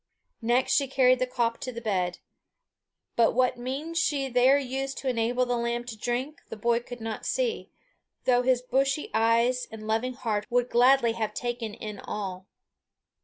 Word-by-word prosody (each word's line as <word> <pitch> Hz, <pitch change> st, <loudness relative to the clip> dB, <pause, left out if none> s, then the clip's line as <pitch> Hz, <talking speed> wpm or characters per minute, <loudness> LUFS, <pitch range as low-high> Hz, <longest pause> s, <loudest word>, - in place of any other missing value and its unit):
Next 240 Hz, +3 st, +2 dB
she 280 Hz, -1 st, +3 dB
carried 255 Hz, -1 st, +4 dB
the 255 Hz, -, 0 dB
caup 235 Hz, -2 st, -1 dB
to 255 Hz, -, -5 dB
the 235 Hz, -, -6 dB
bed; 185 Hz, -6 st, -1 dB, 1.0 s
but 230 Hz, -1 st, +4 dB
what 255 Hz, -1 st, +2 dB
means 285 Hz, +7 st, -3 dB
she 280 Hz, -4 st, 0 dB
there 250 Hz, +3 st, +5 dB
used 270 Hz, 0 st, -3 dB
to 270 Hz, -, -5 dB
enable 245 Hz, +1 st, +1 dB
the 245 Hz, 0 st, 0 dB
lamb 235 Hz, 0 st, -1 dB
to 240 Hz, -2 st, -7 dB
drink, 245 Hz, +7 st, -3 dB
the -, -, -7 dB
boy 235 Hz, +2 st, +2 dB
could 240 Hz, 0 st, -10 dB
not 225 Hz, -1 st, -4 dB
see, -, -, -1 dB, 0.6 s
though 245 Hz, -1 st, +4 dB
his 250 Hz, 0 st, +2 dB
busy 275 Hz, +3 st, 0 dB
eyes 230 Hz, +3 st, +2 dB
and 220 Hz, -1 st, -9 dB
loving 225 Hz, +4 st, 0 dB
heart 220 Hz, -5 st, -2 dB
would 245 Hz, 0 st, +1 dB
gladly 245 Hz, 0 st, +5 dB
have 220 Hz, -2 st, -3 dB
taken 240 Hz, -3 st, -3 dB
in 210 Hz, -3 st, -7 dB
all. 190 Hz, -2 st, -5 dB
245 Hz, 170 wpm, -27 LUFS, 225-260 Hz, 1.0 s, there